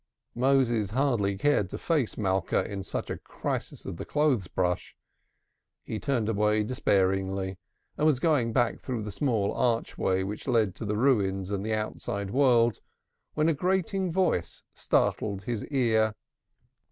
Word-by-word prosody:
Moses 120 -5 +2
hardly 110 -5 +1
cared 125 -6 +2
to - - -5
face 150 -9 0
Malka 95 -3 0
in 100 -2 -5
such 95 - -4
a - - -4
crisis - - -5
of - - -5
the - - -5
clothes 145 - +1
brush. 90 0 -2 0.9
He 110 - -4
turned 120 -5 0
away 105 0 +2
despairingly, 95 -4 0 0.4
and 155 - +4
was 145 -5 +3
going 135 -7 +2
back 120 0 +1
through 120 -4 -3
the 105 - -5
small 110 -3 0
archway 115 -5 0
which 105 +6 -6
led 115 -7 +2
to - - -5
the 105 0 -1
Ruins 100 -7 +1
and 100 -1 -2
the 110 0 0
outside 100 -2 -4
world, 120 -3 +3 0.6
when 155 +1 +2
a 165 - +4
grating 185 +3 0
voice 180 - 0
startled 100 -2 0
his 115 -1 -3
ear. 110 -6 +2
110 Hz, 150 wpm, -28 LUFS, 100-135 Hz, 0.9 s, and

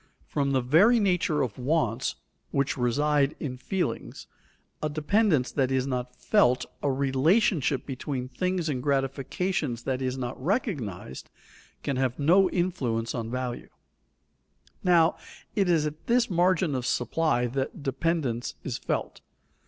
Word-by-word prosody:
From 140 -1 -1
the 130 -1 +2
very 180 - +5
nature 180 -7 +2
of 125 -2 -4
wants, 130 -3 0 0.3
which 140 0 0
reside 140 +3 +1
in 130 -4 -4
feelings, 185 +8 -3 0.6
a 155 - 0
dependence 155 - +2
that 135 -3 +1
is 130 -1 +1
not 125 -2 -3
felt, 130 - +3 0.2
a 145 - +1
relation 140 - +2 0.2
between 130 -1 -4
things 180 +6 -1
and 135 -5 -1
gratification 135 +2 -1
that 130 -1 -1
is 130 0 -1
not 125 0 -5
recognized, 130 - -3 0.5
can 140 -2 -1
have 130 -2 0
no 180 +6 +4
influence 130 -11 -1
on 115 -2 -3
value. 125 0 -4 1.1
Now, 170 -2 +4 0.4
it 195 -3 +2
is 160 -3 +3
at 150 +1 -6
this 235 -2 +2
margin 180 -2 +2
of 125 -2 -2
supply 125 0 +1
that 135 +3 -3
dependence 135 -4 -1
is - - -3
felt. - - -3
140 Hz, 135 wpm, -27 LUFS, 125-170 Hz, 1.1 s, very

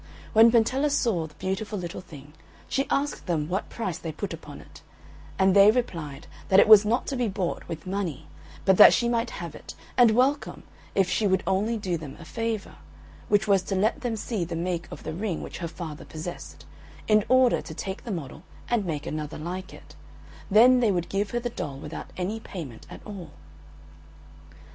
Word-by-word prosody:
When 225 +1 +7
Pentella 255 +5 +3
saw 220 - +1
the 150 - -20
beautiful 195 +3 -3
little 175 -2 -5
thing 150 -4 -13 0.3
she 270 - -1
asked 285 -5 -1
them 155 -4 0
what 190 +4 -2
price 185 -7 -4
they 165 - -5
put 200 +6 -5
upon - - -10
it, - - -15 0.6
and 190 0 +4
they 200 +1 +8
replied 165 - -2 0.2
that 190 - +6
it - - +6
was 215 -1 +9
not 225 +4 0
to 275 - -3
be 245 -2 0
bought 190 -3 -3
with 160 +2 -6
money, 185 -7 -3 0.4
but 190 -2 +5
that - - +10
she 240 - +1
might 235 0 0
have 170 -3 -7
it - - -10 0.2
and 245 -2 +6
welcome 260 +6 +1 0.3
if 195 -2 +3
she 205 +3 +1
would 190 -1 +1
only 200 +5 +1
do 185 -5 -2
them 150 -4 -9
a 170 - -11
favour, 225 +1 -4 0.5
which 205 +1 +3
was 195 -2 +4
to 195 +2 -3
let 210 +4 +1
them 240 -3 -2
see 215 -2 -3
the 170 0 -4
make 170 0 -2
of - - -9
the 160 - -4
ring 185 -1 -3
which - - -8
her 170 - -3
father 160 -2 -7
possessed, 160 +3 -8 0.4
in 215 -1 +4
order 255 -1 +4
to - - -9
take 190 0 -5
the - - -8
model 160 - -5 0.3
and 230 -4 +2
make 150 -3 -3
another 155 -1 -4
like 180 +4 -6
it, - - -14 0.5
then 245 +5 +7
they 230 -4 +3
would 175 -2 -1
give 200 +1 -1
her 240 - -1
the 240 0 -3
doll 140 -10 -5
without 150 +3 -8
any 195 +5 -2
payment 155 - -9
at - - -11
all. 195 -6 -8
190 Hz, 200 wpm, -26 LUFS, 170-225 Hz, 0.6 s, that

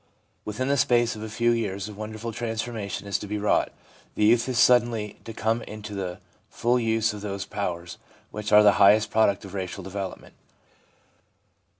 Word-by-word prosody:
Within 115 +5 -3
the 140 +1 +2
space 120 -2 +2
of 105 - -8
a 110 - -5
few 120 +2 +1
years 100 -4 -2
a 105 - -8
wonderful 110 +2 -6
transformation 115 -3 -4
is 100 -1 -1
to 105 - -7
be 105 +1 -3
wrought. 105 0 +1 0.4
The 105 - +2
youth 115 +3 +4
is 125 - -2
suddenly 120 -4 +3
to 115 - -6
come 110 +1 -1
into 105 -1 -8
the 95 -2 -4 0.3
full 120 +2 +1
use 110 -1 +1
of 105 - -8
those 100 -1 -4
powers 85 -4 -5 0.3
which 105 0 -5
are 105 0 +8
the 105 - +7
highest 105 +2 +6
product 105 -2 +2
of 95 - -10
racial 95 -2 -5
development. 95 0 -6
105 Hz, 180 wpm, -25 LUFS, 100-115 Hz, 0.4 s, are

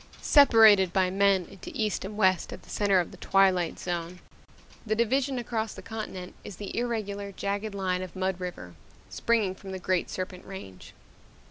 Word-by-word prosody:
Separated 220 - +6
by 185 -1 +2
men 195 -1 +3
into 195 0 -11
East 215 -3 -1
and 205 +2 -7
West 185 -4 +2
at - - -9
the - - -14
center 200 -2 +3
of 175 - -2
the - - -12
Twilight 190 -3 +2
Zone, 175 0 -4 0.7
the 215 -1 -1
division 260 +4 +1
across 225 -2 -3
the - - -10
continent 200 -5 -6
is 200 - -8
the 200 +2 -7
irregular, 205 -4 -3
jagged 200 +2 -3
line 185 -2 -1
of 185 -1 -8
Mud 190 -1 -1
River, 175 - -7 0.4
springing 220 -5 +1
from 190 0 -10
the - - -3
Great 185 -1 -1
Serpent 185 -1 -5
Range. 145 - -10
195 Hz, 170 wpm, -28 LUFS, 185-215 Hz, 0.7 s, Separated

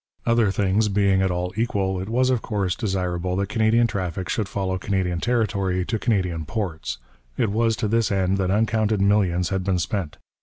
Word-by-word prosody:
Other 115 -3 +3
things 100 +2 +1
being 100 -1 +2
at 95 - +2
all 90 +1 -2
equal, 100 -5 -1
it 95 - -6
was 130 +3 +2
of 125 -3 +1
course 100 -5 -1
desirable 90 -3 -2
that 100 +1 -1
Canadian 110 +2 +3
traffic 95 -4 -3
should 105 -3 -1
follow 95 -1 -2
Canadian 90 -3 -1
territory 100 -5 0
to 110 0 -2
Canadian 90 -8 0
ports; 80 - -4 0.4
it 110 - +1
was 115 +1 +2
to 110 - -2
this 115 +1 +1
end 95 0 +1
that 95 -1 0
uncounted 110 +1 +1
millions 95 -3 +2
had 95 -1 -1
been 95 -1 +1
spent. 90 -2 -3
100 Hz, 185 wpm, -23 LUFS, 90-110 Hz, 0.4 s, Other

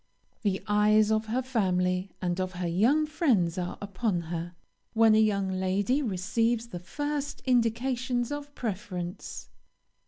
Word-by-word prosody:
"The 195 -3 0
eyes 210 +1 +4
of 220 0 +1
her 250 +4 0
family 185 -6 0
and 175 0 0
of 185 0 -3
her 180 0 -3
young 235 - +3
friends 240 - +1
are 180 0 -3
upon 200 -1 -1
her, 170 +1 -5 0.4
when 225 -1 +5
a 215 - +5
young 200 -3 +1
lady 190 +8 +1
receives 230 +2 0
the 180 - -6
first 290 +9 -4
indications 245 +1 +1
of 290 0 -6
preference. 185 -5 -5
215 Hz, 135 wpm, -28 LUFS, 185-245 Hz, 0.4 s, when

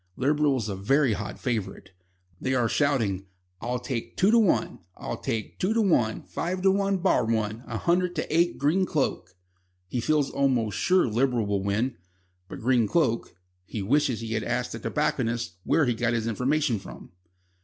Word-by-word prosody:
Liberal 145 +1 +2
is 110 -4 -3
a 100 - -3
very 130 +6 +2
hot 105 +1 -5
favourite. 115 -6 -4 0.5
They 130 0 -1
are 120 -2 +2
shouting: 115 -9 0 0.3
"I'll 125 +2 -1
take 120 -2 -5
two 195 +3 +4
to 235 - +6
one. 210 -5 +1 0.2
I'll - - -4
take 110 -1 -4
two 205 +5 +1
to 230 - +3
one. 120 - +1
Five 185 +2 -3
to 195 - +5
one 195 0 +1
bar 180 -8 +2
one. 110 0 -1
A - - -3
hundred 175 +1 +1
to - - -2
eight 170 +1 +2
Green 175 +7 +2
Cloak." 135 - -2 0.5
He 120 - -2
feels 145 +3 +1
almost 125 -7 +1
sure 185 - +3
Liberal 120 0 +1
will 100 -1 0
win, 105 +5 -1 0.5
but - - -8
Green 120 -2 +3
Cloak 115 - 0 0.3
he 100 +2 -5
wishes 130 +1 +1
he 115 0 -4
had 110 - -1
asked 125 +1 -2
the 115 - -5
tobacconist 120 - -1
where 160 - +3
he 120 - +1
got 120 +1 0
his 115 -1 -1
information 125 +2 0
from. - - -11
125 Hz, 180 wpm, -26 LUFS, 110-150 Hz, 0.5 s, to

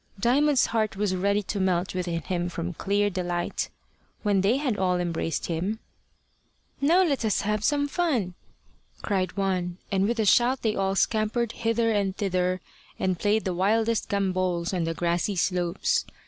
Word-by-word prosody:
Diamond's 270 +5 +3
heart 220 -3 -1
was 200 -1 0
ready 200 +3 +1
to 200 +1 -3
melt 185 -1 0
within 175 -2 -2
him 175 0 -2
from 175 +1 -4
clear 200 +4 +1
delight. 175 -3 -2 0.5
When 205 -3 +2
they 210 +7 +3
had 270 -6 0
all 180 -1 +2
embraced 165 -2 -2
him, 180 +6 -2 1.0
"Now 340 +7 +5
let 280 -8 0
us 215 -2 +1
have 210 0 -1
some 285 +2 +2
fun," 280 - 0 0.7
cried 190 -1 -1
one, 180 -3 -1
and 195 0 +2
with 235 0 -1
a 220 - +2
shout 245 +5 +3
they 220 -2 +1
all 195 0 0
scampered 220 +3 +1
hither 230 0 0
and 200 -3 0
thither, 185 -2 0 0.4
and 185 -2 -1
played 215 +1 +1
the 185 - 0
wildest 220 +5 +1
gambols 185 -3 0
on 175 -3 0
the 165 0 -2
grassy 175 +4 0
slopes. 180 - 0
195 Hz, 160 wpm, -26 LUFS, 180-225 Hz, 1.0 s, Now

